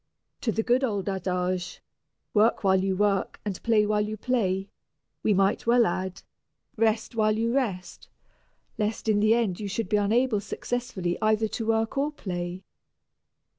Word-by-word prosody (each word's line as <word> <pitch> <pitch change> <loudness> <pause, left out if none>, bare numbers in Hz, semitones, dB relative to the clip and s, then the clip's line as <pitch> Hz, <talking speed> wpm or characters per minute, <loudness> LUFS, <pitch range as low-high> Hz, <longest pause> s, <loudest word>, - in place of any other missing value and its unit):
To 230 - 0
the 225 +1 -1
good 250 +3 +2
old 205 -6 -1
adage, 180 -1 -2 0.5
"Work 215 +1 +3
while 190 -1 +3
you 190 -1 0
work 200 -2 0
and 200 -3 -4
play 220 -2 +3
while 210 0 +1
you 215 +1 -3
play," 195 -5 0 0.5
we - - +1
might 195 +3 +1
well 240 0 +5
add, 185 0 -3 0.5
"Rest 225 +1 +1
while 215 -1 +2
you 230 +1 0
rest," 215 -9 -3 0.7
lest 215 +1 -2
in 210 -1 +3
the 215 +2 +4
end 215 -7 0
you 210 - -4
should 210 +3 -3
be 210 - +3
unable 220 +2 +2
successfully 200 -5 -3
either 215 0 +2
to 225 0 -4
work 225 +4 +1
or 290 +2 0
play. 180 -7 -5
210 Hz, 160 wpm, -26 LUFS, 190-225 Hz, 0.7 s, well